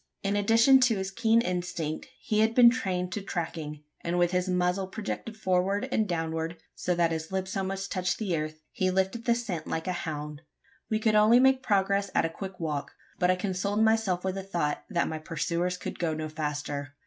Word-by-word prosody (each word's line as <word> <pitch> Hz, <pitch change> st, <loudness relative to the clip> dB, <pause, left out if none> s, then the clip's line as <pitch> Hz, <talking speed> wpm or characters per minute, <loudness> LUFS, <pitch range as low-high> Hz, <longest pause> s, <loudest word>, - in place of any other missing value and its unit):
In 200 Hz, +1 st, 0 dB
addition 225 Hz, +6 st, +5 dB
to 245 Hz, -4 st, +3 dB
his 190 Hz, 0 st, -3 dB
keen 225 Hz, +2 st, +3 dB
instinct, 175 Hz, -5 st, -3 dB
he 215 Hz, -, 0 dB
had 220 Hz, +1 st, +3 dB
been 240 Hz, -2 st, +8 dB
trained 180 Hz, -6 st, -2 dB
to 205 Hz, -, -3 dB
tracking; 160 Hz, -5 st, -4 dB, 0.2 s
and 170 Hz, +1 st, -1 dB
with 175 Hz, 0 st, +3 dB
his 180 Hz, 0 st, 0 dB
muzzle 180 Hz, +1 st, +1 dB
projected 215 Hz, +2 st, -5 dB
forward 195 Hz, +4 st, +1 dB
and 220 Hz, -4 st, +1 dB
downward 165 Hz, 0 st, -2 dB, 0.2 s
so 180 Hz, -, -1 dB
that 170 Hz, -1 st, +2 dB
his 160 Hz, +1 st, -4 dB
lips 190 Hz, 0 st, -2 dB
almost 195 Hz, 0 st, -3 dB
touched 180 Hz, -1 st, 0 dB
the 195 Hz, -6 st, -1 dB
earth 155 Hz, 0 st, -4 dB
he 185 Hz, -, 0 dB
lifted 190 Hz, +5 st, 0 dB
the 235 Hz, -1 st, +4 dB
scent 195 Hz, -9 st, -4 dB
like 160 Hz, -, -2 dB
a 185 Hz, -, -1 dB
hound. 150 Hz, -3 st, -5 dB, 0.5 s
We 220 Hz, -, +2 dB
could 220 Hz, 0 st, +2 dB
only 215 Hz, +3 st, +6 dB
make 265 Hz, 0 st, +4 dB
progress 200 Hz, -3 st, +1 dB
at -, -, +3 dB
a -, -, 0 dB
quick 190 Hz, +3 st, -8 dB
walk; 150 Hz, -4 st, -3 dB, 0.3 s
but 180 Hz, -, +3 dB
I 185 Hz, -, +4 dB
consoled 200 Hz, +3 st, 0 dB
myself 220 Hz, -5 st, +2 dB
with 190 Hz, 0 st, -1 dB
the 195 Hz, -, -4 dB
thought 170 Hz, -6 st, -2 dB
that 175 Hz, -5 st, +1 dB
my 160 Hz, -, -4 dB
pursuers 170 Hz, +3 st, -2 dB
could -, -, -6 dB
go 165 Hz, -3 st, 0 dB
no 155 Hz, 0 st, -4 dB
faster. 145 Hz, -2 st, -4 dB
185 Hz, 205 wpm, -28 LUFS, 165-210 Hz, 0.5 s, been